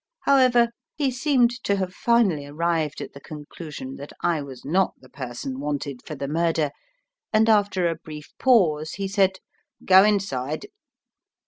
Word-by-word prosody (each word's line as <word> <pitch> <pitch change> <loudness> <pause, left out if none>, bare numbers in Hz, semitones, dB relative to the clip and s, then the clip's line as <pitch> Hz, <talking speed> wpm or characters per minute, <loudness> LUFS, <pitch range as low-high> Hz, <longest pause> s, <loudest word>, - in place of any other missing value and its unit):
However, 255 -4 +4 0.3
he 280 -3 0
seemed 255 -2 +2
to 200 - +1
have 185 -2 -3
finally 200 -13 +2
arrived 160 0 -1
at - - -7
the 140 - -10
conclusion 150 -2 -8
that 140 - -9
I 165 -3 +1
was 135 -3 -10
not 185 +6 +1
the 130 - -18
person 130 0 -6
wanted 145 -2 -3
for 155 - -5
the 140 0 -4
murder, 160 -1 0 0.6
and 220 +1 +4
after 205 -4 +3
a 165 - 0
brief 155 -2 -11
pause 160 -12 +3
he 195 -1 -3
said, 195 -1 +2 0.5
"Go 190 0 +8
inside." 155 -9 0
165 Hz, 150 wpm, -24 LUFS, 145-205 Hz, 0.6 s, Go